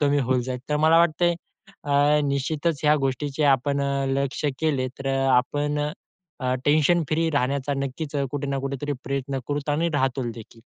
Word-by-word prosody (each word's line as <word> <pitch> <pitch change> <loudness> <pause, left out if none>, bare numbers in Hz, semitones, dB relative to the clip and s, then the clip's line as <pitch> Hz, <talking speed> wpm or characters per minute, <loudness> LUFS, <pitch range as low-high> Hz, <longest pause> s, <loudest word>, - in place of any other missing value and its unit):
कमी 145 -1 +3
होऊन 130 -1 +1
जाईल. 125 0 -4
तर 150 - +1
मला 160 +2 +5
वाटतंय, 170 +1 +3 0.5
अ, 145 +1 +3
निश्चितच 145 +3 -1
ह्या 150 +1 +5
गोष्टीचे 140 +3 -2
आपण 140 +2 -1
अ, 140 0 0
लक्ष 135 +1 -1 0.2
केले 140 -5 0
तर 135 - -7
अ, 135 0 +1 0.2
आपण 145 +4 0 0.6
अ, 130 0 0
टेन्शन 155 +3 +4
फ्री 165 +1 +1
राहण्याचा 140 0 0
नक्कीच 140 +2 -4
अ, 140 - +1
कुठे 145 -1 -3
ना 140 0 -1
कुठेतरी 140 +2 -3
प्रयत्न 135 0 -2
करू 145 0 -3
आणि 160 +4 +1
राहू 130 -3 0
देखील. 115 0 -12
140 Hz, 175 wpm, -24 LUFS, 135-150 Hz, 0.6 s, मला